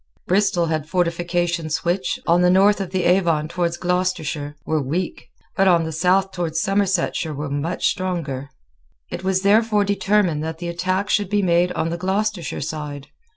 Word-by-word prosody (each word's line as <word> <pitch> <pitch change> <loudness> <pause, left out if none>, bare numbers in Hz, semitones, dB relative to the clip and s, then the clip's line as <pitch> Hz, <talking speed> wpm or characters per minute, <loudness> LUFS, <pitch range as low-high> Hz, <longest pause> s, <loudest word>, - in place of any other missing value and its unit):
Bristol 190 -2 +2
had 155 -2 -2
fortifications 175 -1 -1
which, 180 +2 0
on 170 +1 +3
the 180 - +4
north 195 +3 +4
of 190 - -4
the 185 0 -1
Avon 170 -4 +2
towards 170 0 -2
Gloucestershire, 175 -5 -2
were 155 -1 0
weak, 145 -2 -3 0.3
but 195 - +3
on 170 -3 +4
the 160 - -4
south 185 +4 +2
towards 165 -3 -2
Somersetshire 195 -4 0
were 145 0 -4
much 145 +4 -2
stronger. 155 -8 -3 0.6
It - - -5
was 190 0 0
therefore 210 0 +3
determined 200 -5 +1
that 160 0 -4
the 175 0 -5
attack 185 +4 -1
should 205 -3 +1
be 205 0 +1
made 175 0 +2
on 165 - -1
the 170 - -2
Gloucestershire 190 -1 -2
side. 145 -1 -5
175 Hz, 165 wpm, -21 LUFS, 160-190 Hz, 0.6 s, the